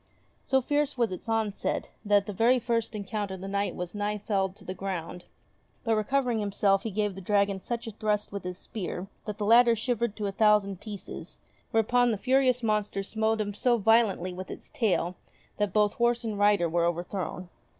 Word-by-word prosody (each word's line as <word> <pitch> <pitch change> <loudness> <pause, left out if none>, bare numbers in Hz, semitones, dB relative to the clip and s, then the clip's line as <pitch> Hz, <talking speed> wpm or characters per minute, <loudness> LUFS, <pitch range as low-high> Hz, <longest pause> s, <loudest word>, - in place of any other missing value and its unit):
So 265 0 +3
fierce 290 +1 0
was 235 -4 +1
its 185 +4 -7
onset, 220 -2 -1
that 205 0 +3
at - - -19
the 205 - -5
very 235 +6 +4
first 230 -2 -1
encounter 200 -1 -3
the 190 +1 -7
Knight 200 +1 -1
was 180 -1 -5
nigh 210 0 -1
felled 195 -2 -1
to - - -15
the 185 - -4
ground; 180 -2 -5 0.6
but 225 - +1
recovering 240 +1 +1
him 205 -1 -2
self 195 -1 +3
he 225 - -3
gave 210 0 -1
the 195 - -8
dragon 200 0 +1
such 235 +3 -4
a 225 - -5
thrust 210 -1 -1
with 200 -1 -5
his 180 0 -5
spear 190 -3 -5 0.2
that 210 -1 -5
the 210 - -2
latter 235 +2 +6
shivered 235 -1 -1
to 210 - -3
a 200 - -1
thousand 200 -2 +3
pieces; 205 -3 -8 0.3
whereupon 240 +2 +3
the 220 - 0
furious 255 +2 +2
monster 210 -2 0
smote 220 +2 0
him 205 -1 -3
so 240 +4 +2
violently 210 -4 +3
with 185 +1 -7
its - - -9
tail 185 -6 0 0.4
that 205 -2 0
both 210 +1 +3
horse 240 0 +1
and 215 -3 -3
rider 205 -4 +4
were 170 +1 +1
overthrown. 175 +1 -3
210 Hz, 200 wpm, -28 LUFS, 195-225 Hz, 0.6 s, latter